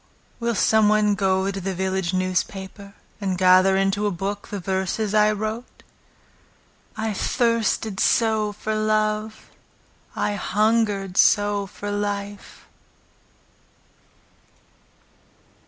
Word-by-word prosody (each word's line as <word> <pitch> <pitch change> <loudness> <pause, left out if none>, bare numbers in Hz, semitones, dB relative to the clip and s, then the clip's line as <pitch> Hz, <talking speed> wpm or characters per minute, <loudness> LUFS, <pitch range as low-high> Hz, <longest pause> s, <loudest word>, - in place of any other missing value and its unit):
Will 235 -1 -1
some 220 +1 +3
one 210 -1 +3
go 190 -1 0
to 195 0 -6
the 190 +1 -3
village 190 -1 -1
newspaper, 190 +2 -3 0.3
And 190 -2 -1
gather 185 +1 +5
into 195 +2 +1
a - - +2
book 200 +2 -4
the 205 - -5
verses 190 +3 -2
I 210 0 +4
wrote?— 215 +3 -5 1.1
I 220 0 -2
thirsted 225 -2 0
so 220 -2 +2
for 210 +1 -4
love 215 0 -1 0.6
I 205 - -1
hungered 205 -2 0
so 205 -1 +3
for 205 +2 -7
life! 205 0 -5
205 Hz, 105 wpm, -23 LUFS, 195-215 Hz, 1.1 s, gather